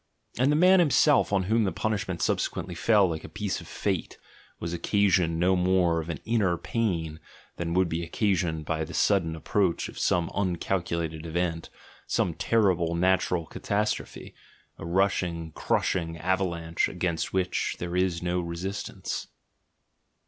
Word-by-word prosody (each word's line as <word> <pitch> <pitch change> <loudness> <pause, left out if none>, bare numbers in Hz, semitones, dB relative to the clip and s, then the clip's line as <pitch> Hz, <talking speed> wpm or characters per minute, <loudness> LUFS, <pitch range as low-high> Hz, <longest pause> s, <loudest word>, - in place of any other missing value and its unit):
And 130 +3 +4
the - - +3
man 185 +4 +6
himself, 150 -5 +4
on 100 -2 +2
whom 110 +4 +2
the 95 - 0
punishment 110 -2 -2
subse - - +1
quently 90 - -6
fell 100 +2 +4
like 80 -2 -4
a - - -9
piece 105 -2 -3
of - - -12
fate, - - -3 0.4
was 85 0 -4
occasioned 90 -2 +2
no 90 +2 +3
more 90 -2 +2
of 80 - -9
an 80 -5 -4
"inner 105 -6 +1
pain" 85 -6 -2 0.4
than 85 0 -2
would 95 -1 +3
be 85 +1 -2
occasioned 85 -3 0
by 80 +1 -1
the 85 +3 -7
sud 100 -2 +3
den 80 -1 -4
approach 90 +2 0
of - - -9
some 85 -2 +1
uncalculated 85 -4 -2
event, 85 0 -2 0.4
some 85 - 0
terrible 90 -6 +1
natural 90 -1 +1
catastrophe, 105 +7 -3 0.5
a - - -6
rushing, 85 -3 0
crushing 80 +1 -1
avalanche 85 -1 0
against 90 -2 -2
which 95 -1 -1
there 85 0 -4
is 90 -2 0
no 90 0 0
resistance. 90 +3 -5
90 Hz, 150 wpm, -27 LUFS, 85-95 Hz, 0.5 s, man